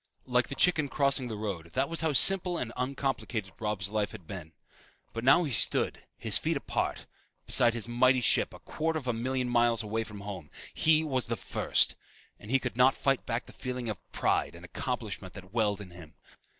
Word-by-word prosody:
Like 125 -1 +2
the 140 - -6
chicken 155 -3 +3
crossing 140 -3 +2
the 110 -3 -5
road, 100 -6 -4
that 135 +2 +1
was 165 +2 -2
how 160 -1 +1
simple 180 +5 +4
and 120 -6 -3
uncomplicated 125 -6 -2
Robb's 105 -3 -2
life 105 0 -1
had 100 -6 -10
been. 85 -3 -8 0.6
But 115 - -4
now 155 +7 +6
he 150 - -3
stood, 110 - +1
his - - +4
feet - - 0
spread - - +1
apart, - - -2 0.4
beside 120 -1 +3
his 115 -1 -4
mighty 125 +2 +4
ship, 120 - +3
a - - -11
quarter 160 +1 -2
of 145 - -6
a 125 - +1
million 130 +2 -1
miles 120 -2 +2
away 110 +2 -2
from 105 -2 -10
home. 95 -7 -7 0.2
He 155 0 +4
was 130 -6 -1
the - - -1
first! - - +1 0.4
And 105 - -12
he 135 - +4
could 125 -2 -5
not 130 +2 +5
fight 135 -1 0
back 120 0 -2
the - - -14
feeling 125 -2 -4
of 105 -5 -7
pride - - 0
and 85 +1 -11
accomplishment 105 -4 -4
that 95 0 -11
welled 105 -3 +1
in 95 -3 -10
him. 85 -3 -13
120 Hz, 205 wpm, -30 LUFS, 105-135 Hz, 0.6 s, now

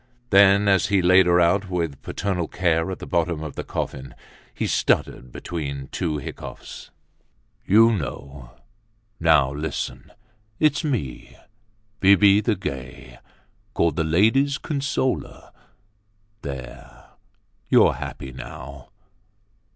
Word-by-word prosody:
Then, 100 +1 +6
as 95 -1 +3
he 100 -1 +2
laid 95 +1 +5
her 90 0 +4
out 95 +3 +2
with 85 -6 -3
paternal 95 -5 -3
care 85 -1 0
at 95 - -4
the - - -9
bottom 85 -3 -1
of 75 - -6
the - - -4
coffin, 65 0 -5 0.4
he - - -3
stuttered 60 0 0
between 70 -5 -6
two 80 -4 -2
hiccoughs: 70 - -9 0.8
"You 115 +3 +6
know—now 80 - -3
listen—it's 110 - -4
me, 115 - -4 0.6
Bibi 100 +1 +5
the 110 0 0
Gay, 65 -7 -8 0.6
called 85 -3 +1
the 80 - 0
ladies' 115 - +2
consoler. 140 -3 -3 0.9
There, 65 -3 -9 0.6
you're - - +5
happy 65 - -7
now. 65 +1 -10
90 Hz, 105 wpm, -23 LUFS, 70-105 Hz, 0.9 s, Then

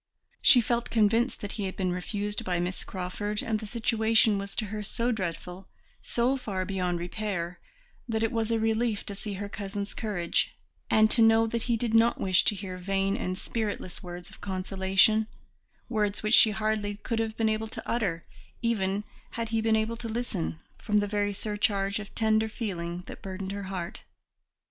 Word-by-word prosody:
She 245 - +8
felt 235 +1 0
convinced 230 +3 +2
that 205 - -4
he 205 - -3
had 190 - -4
been 185 -2 0
refused 205 +3 -3
by 180 -2 0
Miss 180 +2 -2
Crawford, 205 +3 -3
and 220 -2 0
the 215 - -7
situation 220 -2 +3
was 200 0 -6
to 220 - -1
her 210 +1 -4
so 230 +4 0
dreadful, 185 -2 -4 0.3
so 245 +3 +1
far 200 -8 -3
beyond 180 -2 -1
repair, 175 -1 -3 0.5
that 220 0 0
it 225 - +1
was 225 -1 0
a 230 -1 +2
relief 225 -1 +1
to 205 - -4
see 205 +1 -5
her 200 +1 -4
cousin's 200 0 -5
courage, 180 -6 0 0.3
and 215 0 +5
to 235 - +5
know 225 0 +6
that 230 +1 -1
he 235 - +3
did 225 0 -1
not 230 +1 +4
wish 185 -1 +4
to 210 - +3
hear 185 -2 -6
vain 195 +1 0
and 185 0 -2
spiritless 205 -5 -3
words 175 +1 -7
of - - -15
consolation, 195 +3 +2 0.6
words 210 -3 0
which 215 +1 +1
she 225 - +9
hardly 215 -1 -1
could 225 +2 -3
have 220 -1 -2
been 225 - +2
able 220 0 0
to - - -8
utter, 195 -8 -1 0.4
even 205 -3 +1 0.3
had 230 -1 -2
he 225 0 +1
been 220 0 +3
able 220 +1 0
to 230 -1 -5
listen, 150 - -2 0.2
from 210 - +1
the 205 - +3
very 205 0 0
surcharge 205 -1 0
of 210 -1 -9
tender 220 0 +2
feeling 180 -6 -4
that - - -9
burdened 190 0 -5
her 200 0 -4
heart. 180 -3 -5
210 Hz, 185 wpm, -28 LUFS, 190-225 Hz, 0.6 s, she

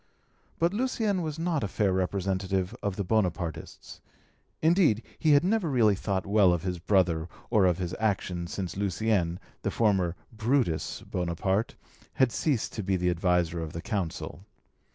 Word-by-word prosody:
But 170 +3 +2
Lucien 220 -5 0
was 155 -2 -4
not 165 -5 0
a - - 0
fair 95 0 +1
representative 95 0 -1
of 100 -2 -2
the 100 - -2
Bonapartists; 90 -6 -2 0.6
indeed 160 - +3 0.2
he 155 -2 +4
had 145 - +5
never 195 -2 +1
really 115 -6 +4
thought 95 -1 -2
well 100 -3 +4
of 85 -1 -2
his 90 -2 -2
brother 85 -3 +1 0.2
or 105 -5 +5
of 90 -2 +2
his 90 -2 -3
actions 95 -5 -1
since 95 -3 -4
Lucien, 95 -2 0 0.2
the - - -1
former 95 -6 +1 0.2
"Brutus" 115 - 0
Bonaparte, 90 +4 -1 0.4
had 130 -3 +3
ceased 135 -5 -1
to 110 - -3
be 95 -1 0
the 90 0 +1
adviser 85 -1 +1
of 80 -2 -5
the 85 - -5
Consul. 90 -4 -4
95 Hz, 155 wpm, -28 LUFS, 90-115 Hz, 0.6 s, had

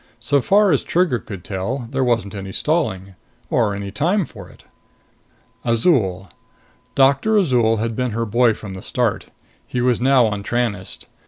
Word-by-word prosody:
So 140 +5 +1
far 200 +6 +4
as 145 - +2
Trigger 170 -8 +1
could 95 -3 -9
tell, 115 +8 -4
there 135 -1 0
wasn't 115 -5 0
any 95 -1 -6
stalling. 100 - -1 0.4
Or 105 -4 +1
any 100 0 -5
time 175 - +1
for 100 -9 -12
it. - - -19 1.0
Azol: 110 - +1 0.7
Doctor 140 +11 +3
Azol 125 - +3
had 115 +1 -2
been 125 +1 -1
her 115 +1 -2
boy 115 +1 +3
from 105 -3 -8
the 95 - -8
start. 120 -1 -1 0.4
He 125 - -3
was 125 -1 +1
now 130 -1 +4
on 105 -2 -2
Tranest. 105 -4 -3
120 Hz, 160 wpm, -20 LUFS, 100-135 Hz, 1.0 s, far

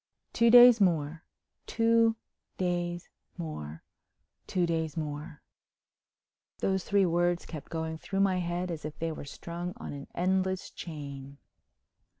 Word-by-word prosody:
Two 235 0 +4
days 245 -1 +9
more—two 200 +7 +1 0.4
days 175 -1 -2 0.3
more—two 155 - -6
days 160 -2 -2
more—those 155 +4 -7
three 200 -1 +3
words 175 0 +1
kept 155 -4 -8
going 160 -1 -3
through 195 +3 -2
my 190 -2 +3
head 175 +1 -2
as 160 -2 -5
if 150 0 -6
they 165 0 -2
were 155 - -7
strung 170 +5 -6
on - - -7
an 140 -1 -8
endless 190 +1 0
chain. 140 -4 -8
175 Hz, 115 wpm, -29 LUFS, 155-190 Hz, 0.4 s, days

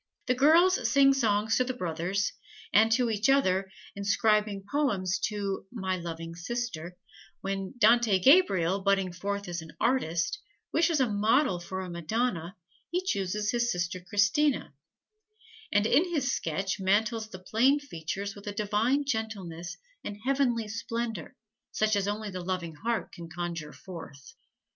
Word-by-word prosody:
The 250 - +2
girls 330 +8 +4
sing 275 -1 +6
songs 220 -4 +1
to 255 - +3
the 255 0 -4
brothers, 180 +1 -1 0.4
and 220 +2 +5
to 240 -1 +2
each 215 +3 +1
other, 195 -9 +3 0.3
inscribing 210 0 +1
poems 195 -11 0
to 200 -3 -3
"my 190 -6 -2
loving 165 -1 -6
sister"; 180 -2 -5 0.4
when 195 +3 -4
Dante 230 -2 +5
Gabriel, 195 - +4
budding 195 -2 +1
forth 200 +3 -3
as 175 -1 -4 0.2
artist, 230 - 0 0.3
wishes 330 -2 +3
a 260 - +3
model 215 0 +2
for 190 +2 -5
a 185 - -6
Madonna, 175 +1 -2 0.3
he 360 +2 -1
chooses 210 - -1
his 240 0 +1
sister 180 -1 -2
Christina, 210 +10 +1 1.0
and 205 +1 +3
in 320 +10 +3
his 275 -7 0
sketch 190 +5 -2
mantles 220 +3 +1
the 185 - -8
plain 235 +10 +2
features 200 - -5
with 200 +1 -13
a 205 - -3
divine 215 +7 +1
gentleness 195 -8 -4 0.3
and 205 - -5
heavenly 255 -5 +1
splendor 230 -3 -4 0.4
such 215 0 +1
as 200 -1 0
only 210 0 -3
the 185 -1 -5
loving 175 -2 -3
heart 225 +9 -2
can 170 -2 -10
conjure 170 -2 -5
forth. 165 - -11
205 Hz, 145 wpm, -29 LUFS, 185-240 Hz, 1.0 s, sing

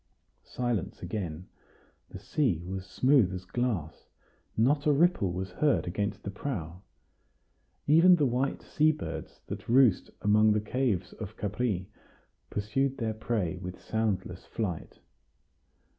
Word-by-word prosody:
Silence 120 -6 -2
again. 90 -5 -4 0.6
The - - -8
sea 100 - 0
was 95 +1 -5
smooth 125 -1 +4
as 90 0 -7
glass. 95 -7 -3 0.5
Not 145 +6 +3
a - - +6
ripple 145 - +3
was 95 +1 -4
heard 145 +10 +2
against 100 +3 -2
the 100 - -4
prow. 90 - -5 1.0
Even 165 +5 +7
the 150 -4 +2
white 130 +2 0
sea 155 +1 +3
birds 155 - -7
that - - -7
roost 125 -5 +4
among 105 +1 +5
the 105 - +2
caves 105 -4 -1
of 110 0 -8
Capri 105 -3 -1 0.6
pursued 135 +6 -1
their 110 -2 -1
prey 105 -5 -2
with 90 0 -7
soundless 100 -5 -2
flight. 90 -8 -4
105 Hz, 130 wpm, -29 LUFS, 95-130 Hz, 1.0 s, Even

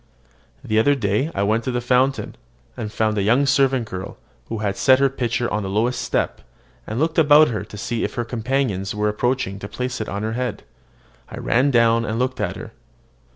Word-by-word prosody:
The 110 0 +1
other 145 +6 +4
day 110 +4 0
I 100 - +1
went 110 +3 +1
to - - -1
the 120 - -1
fountain, 125 +2 +1 0.4
and 105 - -5
found 110 -1 0
a - - +1
young 120 +8 +3
servant 135 -3 +2
girl, 95 -2 -7 0.3
who 115 - -4
had 105 -2 -2
set 130 -1 +5
her 135 0 +3
pitcher 120 -2 -1
on 105 - 0
the 95 - -4
lowest 115 +6 0
step, - - -1 0.5
and 110 +3 -3
looked 160 +2 +1
around 145 -8 +4
to 105 - -9
see 115 +2 -3
if - - -2
one 120 - 0
of - - -10
her 120 - -6
companions 115 -5 -1
was 105 0 0
approaching 115 -3 -1
to 100 - -6
place 125 +3 -4
it 110 - -4
on 100 +1 -4
her 110 +1 -2
head. 125 -3 -3 0.7
I - - -8
ran 130 +5 +2
down, 115 -2 +3
and 110 0 -2
looked 130 +1 -1
at - - -2
her. - - -9
115 Hz, 215 wpm, -21 LUFS, 105-130 Hz, 0.7 s, set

